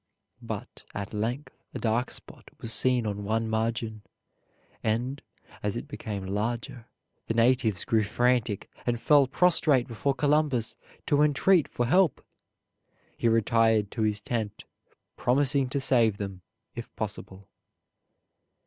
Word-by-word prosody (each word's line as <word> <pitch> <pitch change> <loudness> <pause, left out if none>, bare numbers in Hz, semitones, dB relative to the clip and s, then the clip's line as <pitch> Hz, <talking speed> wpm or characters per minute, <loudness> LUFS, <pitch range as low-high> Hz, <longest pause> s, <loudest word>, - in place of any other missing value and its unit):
But - - -7
at 100 +1 -5
length 120 +7 -3 0.2
a - - -1
dark 120 +2 0
spot - - -7
was 115 - -1
seen 125 -1 +3
on 105 -1 -3
one 110 +2 0
margin; 110 -1 -2 0.8
and, 120 +6 -1 0.4
as 105 +2 -2
it 120 - -6
became 105 -9 -5
larger, 115 +4 -3 0.4
the 115 - -1
natives 115 -5 +2
grew 110 -1 +2
frantic 120 -1 0 0.2
and 120 -1 0
fell 145 +1 +5
prostrate 150 -5 +3
before 135 +3 -1
Columbus 145 -5 +1 0.3
to 145 -1 +2
entreat 150 +3 +4
for 120 - -2
help. 175 +3 +2 0.9
He - - 0
retired 115 -2 +3
to 115 - -4
his 105 -1 +1
tent, 110 -1 -4 0.5
promising 135 +1 +2
to 140 - -1
save 120 -6 +3
them, 100 -2 -6 0.3
if 120 - -8
possible. 100 -2 -6
115 Hz, 130 wpm, -27 LUFS, 110-130 Hz, 0.9 s, fell